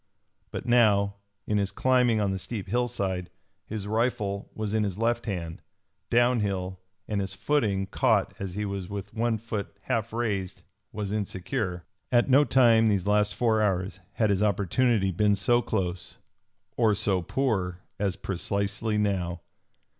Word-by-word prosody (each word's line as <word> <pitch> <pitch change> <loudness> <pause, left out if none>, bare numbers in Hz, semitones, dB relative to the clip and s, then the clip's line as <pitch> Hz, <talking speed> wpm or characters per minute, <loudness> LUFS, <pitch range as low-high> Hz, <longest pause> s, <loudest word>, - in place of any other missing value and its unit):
But - - -6
now, 105 -5 +3 0.3
in 105 -1 +1
his 100 -1 0
climbing 125 -2 +2
on 100 -2 +1
the 95 - -2
steep 105 -1 -5
hillside, 95 -5 -1 0.4
his 105 -2 -4
rifle 105 -2 -1
was 110 -1 -3
in 110 -1 +2
his 100 -2 -2
left 115 +1 0
hand, 85 -5 -4 0.5
downhill, 105 -7 +1 0.3
and 105 -2 -1
his 95 0 -3
footing, 100 -3 +1
caught 110 -1 +1
as 95 -2 -5
he 105 0 -2
was 100 -2 -4
with 100 -1 -6
one 115 0 0
foot 105 -2 -5
half 110 +1 -1
raised, 105 -5 -2 0.3
was 105 -1 -4
insecure. 95 -3 -3 0.3
At 120 +1 +3
no 140 +3 +7
time 115 -4 +5
these 100 -4 +1
last 105 0 +2
four 110 -3 +2
hours 95 -1 0
had 110 -3 +2
his 100 0 +1
opportunity 105 +1 +2
been 105 +3 +3
so 120 +5 +3
close 90 -6 -3 0.6
or 110 -3 +3
so 100 -3 +1
poor 90 -5 -1 0.2
as 100 -2 0
precisely 100 +3 -2
now! 90 -5 -1
105 Hz, 150 wpm, -27 LUFS, 95-115 Hz, 0.6 s, no